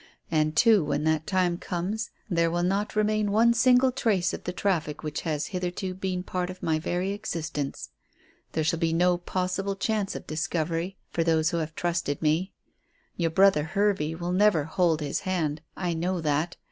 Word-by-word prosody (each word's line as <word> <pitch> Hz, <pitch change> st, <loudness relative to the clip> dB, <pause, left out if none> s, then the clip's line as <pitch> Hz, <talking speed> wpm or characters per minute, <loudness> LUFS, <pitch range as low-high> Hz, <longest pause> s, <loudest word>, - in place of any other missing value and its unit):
And, 155 Hz, -1 st, +1 dB
too, 220 Hz, -2 st, +5 dB
when 145 Hz, 0 st, -1 dB
that 160 Hz, 0 st, +1 dB
time 180 Hz, -2 st, +1 dB
comes 200 Hz, +6 st, -3 dB, 0.2 s
there 170 Hz, -4 st, +2 dB
will 175 Hz, +1 st, 0 dB
not 195 Hz, +4 st, 0 dB
remain 215 Hz, -1 st, +1 dB
one 230 Hz, +3 st, +5 dB
single 250 Hz, +2 st, +4 dB
trace 215 Hz, -8 st, +1 dB
of -, -, -6 dB
the 180 Hz, -, -1 dB
traffic 175 Hz, -6 st, -1 dB
which 150 Hz, 0 st, -3 dB
has 155 Hz, -3 st, -2 dB
hitherto 180 Hz, +1 st, -3 dB
been 185 Hz, -1 st, -3 dB
part 180 Hz, -1 st, -3 dB
of 185 Hz, -, -9 dB
my 160 Hz, -1 st, +1 dB
very 180 Hz, +4 st, -1 dB
existence. 165 Hz, -8 st, -4 dB, 0.6 s
There 160 Hz, -, 0 dB
shall 160 Hz, +2 st, 0 dB
be 165 Hz, -1 st, +1 dB
no 175 Hz, +1 st, +3 dB
possible 185 Hz, +2 st, -2 dB
chance 205 Hz, 0 st, -1 dB
of -, -, -7 dB
discovery 165 Hz, +3 st, -2 dB
for 165 Hz, -, 0 dB
those 160 Hz, 0 st, +2 dB
who 170 Hz, -, -1 dB
have 160 Hz, -1 st, -3 dB
trusted 170 Hz, -5 st, -1 dB
me. 160 Hz, +5 st, +1 dB, 0.6 s
Your 170 Hz, -2 st, 0 dB
brother 190 Hz, -2 st, +4 dB
Hervey 175 Hz, -2 st, 0 dB
will 175 Hz, +1 st, -3 dB
never 190 Hz, -5 st, +4 dB
hold 160 Hz, 0 st, +1 dB
his 145 Hz, -1 st, -1 dB
hand. 160 Hz, -6 st, -1 dB, 0.2 s
I 175 Hz, -2 st, -1 dB
know 175 Hz, +3 st, -1 dB
that. 155 Hz, +2 st, -1 dB
175 Hz, 180 wpm, -27 LUFS, 160-195 Hz, 0.6 s, too